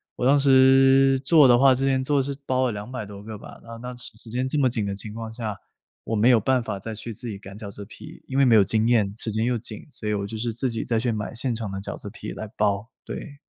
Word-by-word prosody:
我 125 - -2
当 140 +1 +5
时 135 0 +5
做 150 -3 +6
的 120 -1 +6
话 135 0 +6
之 135 +2 -1
前 130 -1 +1
做 140 0 +2
是 140 +1 -3
包 130 0 +1
了 120 - -1
200 110 +3 -6
多 100 0 -10
个 110 -1 -7
吧。 - - -12
那 115 0 -9
那 125 +2 -7
时 120 -2 -13
间 125 +3 -1
这 140 - -2
么 130 -3 +3
紧 110 -4 -2
的 100 - -3
情 105 +1 -6
况 115 0 -6
下， 110 -3 -5 0.5
我 115 - -2
没 110 +2 +3
有 120 -3 +6
办 130 +4 +1
法， 100 - -4
再 110 +3 -6
去 115 +2 -7
自 120 +4 -9
己 105 -4 -5
擀 95 0 -11
饺 105 -2 -7
子 100 0 -9
皮。 115 - -13
因 135 +1 -1
为 140 - +5
没 120 -3 +5
有 105 - +7
经 110 +3 +1
验， 110 -5 +2
时 110 0 0
间 110 +2 0
又 125 0 +1
紧， 110 -1 -8
所 110 -5 -5
以 - - +1
我 100 -1 -2
就 110 - -7
是 115 +1 -2
自 125 +4 -2
己 115 - -2
再 115 -2 0
去 120 +1 0
买 105 -2 -4
现 120 +1 0
成 110 -3 -5
的 95 - -5
饺 100 - -5
子 - - -8
皮 - - -8
来 110 - -6
包， 105 +1 0 0.2
对。 145 -3 -7
115 Hz, 300 characters per minute, -24 LUFS, 105-130 Hz, 0.5 s, 有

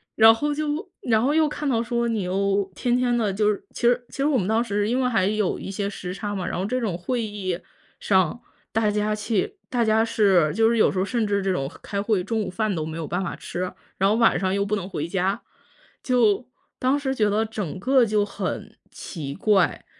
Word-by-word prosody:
然 225 0 +8
后 295 +6 -1
就 300 +5 -2
然 225 -2 +2
后 265 - +2
又 315 -1 +4
看 295 -1 -3
到 230 -3 +2
说 235 0 -1
你 220 -4 -1
又 195 +1 0
天 245 +3 +1
天 245 -1 +1
的 220 -4 +1
就 210 +2 +2
是， 205 - -5
其 - - -9
实 240 +1 +3
其 - - -12
实 275 - +1
我 295 -2 +2
们 190 - -1
当 225 +2 +2
时 205 -2 -1
因 250 +2 +1
为 255 - +2
还 220 -6 +2
有 210 -2 0
一 - - -7
些 200 +1 -2
时 180 -3 -6
差 205 +2 -4
嘛， 190 -3 -3
然 - - -3
后 185 - -1
这 255 +5 -1
种 195 -7 -1
会 235 +7 -2
议 195 -5 -3 0.4
上， 190 +3 +2 0.3
大 220 -1 +2
家 210 +1 0
去 230 - -1
大 240 -2 +1
家 220 +1 +3
是 195 -8 +3
就 225 0 +4
是 230 0 +2
有 215 - +4
时 190 - -5
候 185 - +1
甚 225 +1 0
至 200 -1 0
这 190 - +1
种 135 -6 -2
开 200 -2 -2
会， 205 -3 +1
中 225 +2 -1
午 205 - -3
饭 210 +1 -1
都 155 - -2
没 160 +1 -5
有 165 - -4
办 180 +4 -1
法 - - -4
吃， 180 +1 -4 0.3
然 195 +1 +4
后 215 - +3
晚 230 0 +4
上 190 -1 0
又 200 0 +1
不 205 +1 0
能 190 -2 -5
回 155 -4 -3
家。 190 +2 -1 0.6
就 240 -2 +2 0.3
当 260 +3 +2
时 265 -2 -1
觉 215 -5 +2
得 215 +2 +1
整 205 -5 -5
个 260 +5 +4
就 210 -1 +1
很 - - -5 0.2
奇 145 -6 -6
怪， 205 -1 +2
210 Hz, 260 characters per minute, -24 LUFS, 195-235 Hz, 0.6 s, 然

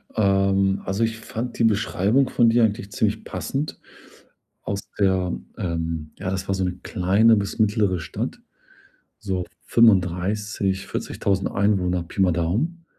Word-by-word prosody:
Ähm, 100 -1 +2
also, 100 +4 0
ich 115 0 -1
fand 120 +1 -5
die - - +3
Beschreibung 110 +4 +2
von 120 -2 +4
dir 120 +1 +4
eigentlich 105 -2 0
ziemlich - - 0
passend. 145 +3 -4 0.8
Aus 100 0 -3 0.2
der 95 -4 +2 0.2
ähm, 80 -3 -3
ja, 95 - -3
das 95 0 -3
war 95 - 0
so 95 - -1
‘ne 90 0 -4
kleine 100 +5 +3
bis 100 +3 -3
mittlere 105 -4 +2
Stadt. 80 - -5 0.8
So 95 -4 -2 0.2
35, 95 -1 +2
40.000 95 -1 -2
Einwohner 95 -3 +1
Pi 85 - -6
mal 95 -2 +4
Daumen. 115 - -1
100 Hz, 140 wpm, -23 LUFS, 90-110 Hz, 0.8 s, von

